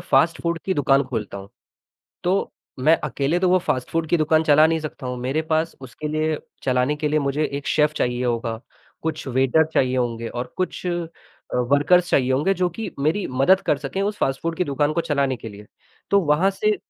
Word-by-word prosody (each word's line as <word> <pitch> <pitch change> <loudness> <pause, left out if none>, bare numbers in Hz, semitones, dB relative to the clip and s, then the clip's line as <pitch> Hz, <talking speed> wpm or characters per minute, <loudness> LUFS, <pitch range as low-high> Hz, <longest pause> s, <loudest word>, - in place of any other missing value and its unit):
Fast 155 +5 +2
food 170 -1 -1
की 190 - 0
दुकान 140 -1 +3
खोलता 110 -6 -4
हूँ, 100 0 -10 0.8
तो 185 +2 0 0.3
मैं 155 +6 +4
अकेले 145 +5 0
तो 185 - +3
वो 185 +1 +5
फ़ास्ट 130 -7 -2
फ़ूड 165 -1 -1
की 175 - +3
दुकान 155 0 +3
चला 155 0 +6
नहीं 160 0 0
सकता 150 -3 -7
हूँ। 125 0 -3
मेरे 135 +6 -1
पास 160 +1 -1
उसके 135 +4 -7
लिए 155 0 0 0.2
चलाने 130 +3 +1
के 150 0 -1
लिए 155 +1 +2
मुझे 140 +2 0
एक 140 -1 -4
शेफ़ 150 0 +2
चाहिए 125 0 0
होगा, 115 -1 -2 0.4
कुछ 160 -3 -3
वेटर 135 +5 +3
चाहिए 130 -1 +2
होंगे 115 -2 -1
और 125 +1 -6
कुछ 185 0 -3
अ, 175 -2 -2 0.5
वर्कर्स 145 +8 +3
चाहिए 130 -1 +3
होंगे 150 +9 +2
जो 180 -1 +1
कि 220 +6 -5
मेरी 160 +8 +1
मदद 160 +9 +4
कर 145 - +3
सकें 150 +7 -4
उस 205 +1 -1
फ़ास्ट 135 0 0
फूड 165 -1 -2
की 180 - +1
दुकान 145 +1 0
को 170 - 0
चलाने 140 -5 0
के 115 +1 -8
लिए। 105 0 -12 0.4
तो 200 0 +5
वहाँ 165 +4 +2
से 210 +2 0
150 Hz, 210 wpm, -22 LUFS, 130-165 Hz, 0.8 s, चला